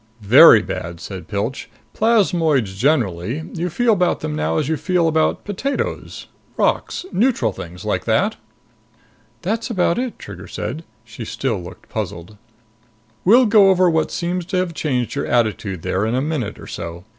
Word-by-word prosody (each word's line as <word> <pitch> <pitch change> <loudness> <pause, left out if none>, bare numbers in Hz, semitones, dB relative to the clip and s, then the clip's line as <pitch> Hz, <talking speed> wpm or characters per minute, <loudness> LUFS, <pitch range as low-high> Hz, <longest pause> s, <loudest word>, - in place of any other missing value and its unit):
"Very 100 - +8
bad," 85 0 -5
said 95 0 -8
Pilch. 110 +6 -3 0.2
"Plasmoids 170 - +2
generally, 120 - 0
you 175 +1 -2
feel 230 +7 +2
about 180 -3 +1
them 75 - -3
now 75 +1 -1
as 145 - 0
you 160 - +1
feel 180 0 +1
about 160 0 +1
potatoes... 240 +7 -3 0.3
rocks... - - 0
neutral 220 - +1
things 90 -1 -9
like - - -1
that?" - - +1 1.1
"That's 220 +6 -2
about 185 -3 +1
it," 255 -2 -3
Trigger 95 -2 -10
said. 115 +10 -5 0.2
She 110 +1 -9
still 115 -3 -2
looked 85 - -12
puzzled. 85 +5 -6 0.9
"We'll 240 +7 +6
go 210 -3 +6
over 185 -2 +4
what 160 -1 +1
seems 180 +1 -2
to 190 -1 -1
have 180 -2 -1
changed 130 -7 -1
your 140 - -2
attitude 105 -6 0
there 100 +4 0
in 115 - 0
a - - +1
minute 140 -8 -3
or - - -11
so. 85 +1 -7
145 Hz, 160 wpm, -20 LUFS, -, 1.1 s, Very